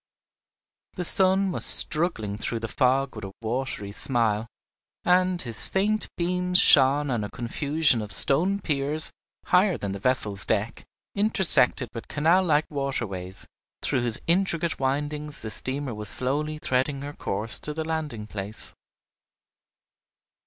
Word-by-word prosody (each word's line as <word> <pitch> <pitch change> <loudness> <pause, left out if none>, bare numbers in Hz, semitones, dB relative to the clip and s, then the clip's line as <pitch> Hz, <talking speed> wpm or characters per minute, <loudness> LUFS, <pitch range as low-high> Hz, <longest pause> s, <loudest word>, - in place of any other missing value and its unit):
The 180 - -4
sun 190 +2 +3
was - - -3
struggling 150 - +2
through 115 +2 -4
the 115 - -4
fog 130 +2 0
with 110 - -9
a 95 - -7
watery 115 -3 -4
smile, 115 -1 0 0.6
and 180 0 +2
his 115 -7 -1
faint 210 +2 0
beams 180 +1 +1
shone 140 -1 +6
on 115 -4 -1
a 105 - -5
confusion 140 +2 0
of 105 -2 -7
stone 175 - +3
piers, 150 0 +1 0.3
higher 185 -1 +2
than 100 - -5
the 100 - -6
vessel's 105 -4 +1
deck, 110 +1 -2 0.3
intersected 190 - +3
with 115 - -8
canal 165 +6 +2
like 155 -2 +2
waterways, 110 -10 -3 0.4
through 130 - 0
whose 120 -2 +4
intricate 170 -2 0
windings 145 +2 -3
the 110 - -6
steamer 130 +1 -4
was 105 -1 -6
slowly 150 +4 -2
threading 135 0 -1
her 145 +1 -7
course 110 -1 -4
to 150 - -5
the 160 +1 -4
landing 155 -9 -4
place. 105 0 -7
140 Hz, 140 wpm, -25 LUFS, 115-160 Hz, 0.6 s, shone